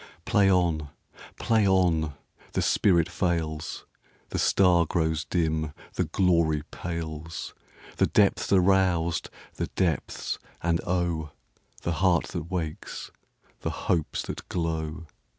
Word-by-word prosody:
Play 100 Hz, -2 st, +4 dB
on! 85 Hz, -5 st, +1 dB, 0.5 s
Play 110 Hz, -3 st, +3 dB
on! 85 Hz, -6 st, +2 dB, 0.4 s
The -, -, +1 dB
spirit 85 Hz, -4 st, +3 dB
fails, 85 Hz, -3 st, -2 dB, 0.4 s
The -, -, -2 dB
star 90 Hz, -3 st, +4 dB
grows 80 Hz, -2 st, 0 dB
dim, 80 Hz, -3 st, 0 dB, 0.2 s
the -, -, 0 dB
glory 85 Hz, -5 st, +2 dB
pales, 80 Hz, -1 st, -5 dB, 0.4 s
The -, -, +4 dB
depths -, -, +2 dB
are 95 Hz, -, +6 dB
roused—the 90 Hz, -3 st, 0 dB
depths, 85 Hz, -6 st, -1 dB, 0.2 s
and 85 Hz, -1 st, +1 dB
oh! 85 Hz, -3 st, 0 dB, 0.5 s
The 85 Hz, -, 0 dB
heart 90 Hz, -3 st, +3 dB
that 85 Hz, -1 st, -5 dB
wakes, 80 Hz, -4 st, -4 dB, 0.5 s
the -, -, -2 dB, 0.2 s
hopes 80 Hz, -4 st, 0 dB
that -, -, -7 dB
glow! 80 Hz, 0 st, -2 dB
85 Hz, 115 wpm, -27 LUFS, 80-90 Hz, 0.5 s, are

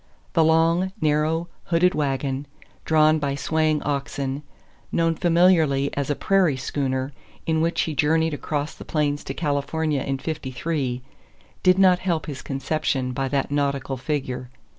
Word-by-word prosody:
The 165 Hz, -, +4 dB
long, 165 Hz, +3 st, +3 dB
narrow, 155 Hz, +2 st, +1 dB, 0.2 s
hooded 180 Hz, +2 st, +3 dB
wagon, 140 Hz, -2 st, -1 dB, 0.4 s
drawn 155 Hz, 0 st, +4 dB
by 140 Hz, -2 st, -1 dB
swaying 155 Hz, +1 st, 0 dB
oxen, 140 Hz, -1 st, -2 dB, 0.5 s
known 165 Hz, 0 st, +2 dB
familiarly 165 Hz, -5 st, +3 dB
as 140 Hz, 0 st, -2 dB
a 145 Hz, -, +1 dB
"prairie 185 Hz, -7 st, +2 dB
schooner," 130 Hz, 0 st, -2 dB, 0.3 s
in 160 Hz, -1 st, +1 dB
which 165 Hz, +1 st, +1 dB
he 160 Hz, -, -2 dB
journeyed 160 Hz, +2 st, +2 dB
across 145 Hz, +1 st, -3 dB
the -, -, -10 dB
plains 145 Hz, -2 st, -1 dB
to 135 Hz, -, -5 dB
California 150 Hz, -1 st, -1 dB
in 135 Hz, 0 st, -2 dB
'53, 135 Hz, -3 st, -3 dB, 0.6 s
did 185 Hz, 0 st, +5 dB
not 185 Hz, -2 st, +5 dB
help 170 Hz, -4 st, -1 dB
his 145 Hz, -4 st, -6 dB
conception 135 Hz, -1 st, -1 dB
by 135 Hz, +1 st, -1 dB
that 140 Hz, 0 st, -1 dB
nautical 140 Hz, -2 st, -1 dB
figure. 130 Hz, -2 st, -3 dB
150 Hz, 140 wpm, -24 LUFS, 135-160 Hz, 0.6 s, did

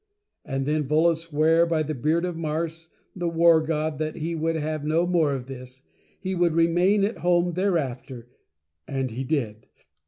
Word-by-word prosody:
And 135 Hz, -2 st, -3 dB
then 150 Hz, -1 st, 0 dB
Volos 160 Hz, +3 st, +3 dB
swore 165 Hz, +1 st, +2 dB
by 160 Hz, -2 st, +1 dB
the 155 Hz, +1 st, -3 dB
Beard 155 Hz, +6 st, 0 dB
of 175 Hz, -2 st, -3 dB
Mars, 160 Hz, 0 st, -4 dB, 0.3 s
the 175 Hz, -2 st, -2 dB
War 165 Hz, -1 st, +5 dB
God, 155 Hz, -1 st, -2 dB
that 155 Hz, -1 st, -2 dB
he 165 Hz, +1 st, -3 dB
would 165 Hz, 0 st, -1 dB
have 155 Hz, -1 st, -3 dB
no 160 Hz, +3 st, +1 dB
more 170 Hz, -5 st, +2 dB
of 125 Hz, -2 st, -6 dB
this 130 Hz, 0 st, -10 dB, 0.2 s
— -, -, -37 dB
He 190 Hz, 0 st, -2 dB
would 175 Hz, -2 st, +2 dB
Re 165 Hz, 0 st, +4 dB
main 185 Hz, +4 st, +2 dB
at 210 Hz, +3 st, -1 dB
Home 175 Hz, 0 st, +2 dB
thereafter 135 Hz, -9 st, -2 dB, 0.6 s
And 135 Hz, -3 st, -2 dB
he 125 Hz, +4 st, -4 dB
Did. 120 Hz, -7 st, -3 dB
160 Hz, 185 wpm, -25 LUFS, 145-170 Hz, 0.6 s, War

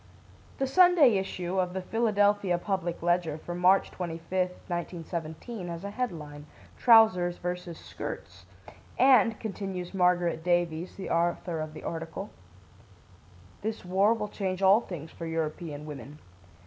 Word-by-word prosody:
The 270 Hz, -, 0 dB
Sunday 300 Hz, -, +5 dB
issue 185 Hz, -1 st, -3 dB
of 180 Hz, -1 st, 0 dB
the 190 Hz, -, -3 dB
Philadelphia 205 Hz, -4 st, +2 dB
Public 175 Hz, -2 st, -3 dB
Ledger 175 Hz, -3 st, +1 dB
for 175 Hz, +2 st, -7 dB
March 180 Hz, +2 st, +3 dB
25, 180 Hz, +1 st, -2 dB, 0.2 s
1917, 175 Hz, +3 st, -5 dB
has 170 Hz, +1 st, -6 dB
a 200 Hz, -, -5 dB
headline, 155 Hz, -11 st, -5 dB, 0.3 s
"Trousers 220 Hz, -7 st, +5 dB
vs. 180 Hz, -1 st, -5 dB
Skirts," -, -, -8 dB, 0.5 s
and, 240 Hz, -4 st, +5 dB
continues 195 Hz, -4 st, -5 dB
Margaret 175 Hz, -3 st, +2 dB
Davies, 175 Hz, -1 st, 0 dB
the 195 Hz, -, -6 dB
author 170 Hz, 0 st, 0 dB
of 155 Hz, 0 st, -5 dB
the -, -, -9 dB
article: 165 Hz, +4 st, -5 dB, 1.3 s
"This 220 Hz, -2 st, -4 dB
war 195 Hz, +5 st, +3 dB
will 210 Hz, -2 st, -3 dB
change 190 Hz, -2 st, -3 dB
all 195 Hz, +4 st, +6 dB
things 165 Hz, -7 st, -8 dB
for 165 Hz, -, -7 dB
European 155 Hz, -2 st, -4 dB
women. 150 Hz, -1 st, -9 dB
180 Hz, 130 wpm, -28 LUFS, 170-200 Hz, 1.3 s, all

